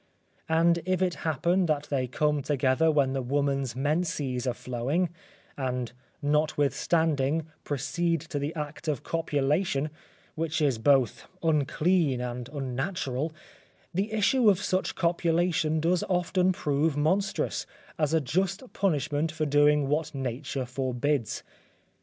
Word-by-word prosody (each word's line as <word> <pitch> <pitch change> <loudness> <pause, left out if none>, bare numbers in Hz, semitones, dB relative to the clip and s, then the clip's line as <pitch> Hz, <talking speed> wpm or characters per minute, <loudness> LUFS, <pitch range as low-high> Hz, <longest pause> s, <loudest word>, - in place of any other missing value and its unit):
And 170 +1 +4
if 185 +1 0
it 180 -2 +1 0.2
happen 175 +5 +2
that 150 -2 +1
they 130 -3 0
come 150 +3 +1
together 140 +3 +2
when 140 -4 +2
the 135 - -1
woman's 135 -1 0
menses 145 -3 -1
are 125 - +1
flowing, 135 +9 -1 0.5
and 125 -3 -2 0.3
notwithstanding, 150 0 +1 0.2
proceed 165 +4 0
to 155 -2 -4
the 145 +4 -3
act 150 +1 -6
of 150 -5 -1
copulation, 150 -1 0 0.4
which 160 0 -2
is 140 -7 +2
both 130 -1 +2 0.2
unclean 155 -1 +2
and 125 0 -4
unnatural, 140 +1 -2 0.6
the 195 +5 -1
issue 220 +2 +4
of 195 - +4
such 190 -2 -1
copulation 170 -2 +1
does 170 +3 +1
often 180 +1 +2
prove 150 -2 0
monstrous, 190 +7 0 0.3
as 150 -2 +2
a 160 - +4
just 190 - -2
punishment 150 -4 0
for 155 0 -2
doing 145 0 +4
what 150 +1 -1
nature 135 +1 -3
forbids. 130 0 -1
150 Hz, 125 wpm, -28 LUFS, 135-170 Hz, 0.6 s, And